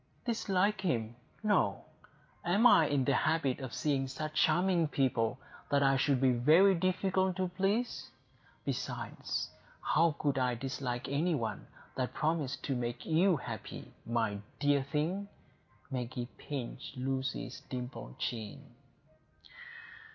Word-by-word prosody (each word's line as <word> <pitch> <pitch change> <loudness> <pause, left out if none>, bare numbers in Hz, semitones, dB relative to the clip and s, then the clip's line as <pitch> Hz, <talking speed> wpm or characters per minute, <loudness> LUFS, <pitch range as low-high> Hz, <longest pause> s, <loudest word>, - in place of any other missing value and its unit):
"Dislike 205 -4 +1
him! 120 - -1 0.3
No. 210 -1 +2 0.6
Am 195 +7 +3
I 165 -10 +7
in 140 -3 +1
the 140 - +3
habit 150 -2 +1
of 130 -2 -5
seeing 140 -3 0
such 155 +4 -5
charming 170 +2 +3
people, 125 -4 +1 0.3
that 140 0 +3
I 135 0 +4
should 135 0 +2
be 130 0 +4
very 155 +11 +6
difficult 185 +1 +1
to 185 -1 -1
please? 195 +7 -1 0.6
Besides, - - -3 0.3
how 165 -2 +2
could 140 -2 0
I 125 -1 +1
dislike 125 0 -3
any 155 +5 +1
one 115 -5 -3 0.3
that 130 -1 -2
promised 155 -4 -1
to 135 - -1
make 120 0 -3
you 170 +2 +4
happy, 115 -5 -7
my 115 -3 0 0.2
dear 145 -1 +3
thing!" 155 +9 -1 0.6
Maggie 125 -1 -3
pinched 135 -2 -6
Lucy's 130 0 -3
dimpled 125 - -6
chin. 110 -4 -5
140 Hz, 125 wpm, -32 LUFS, 125-175 Hz, 0.6 s, I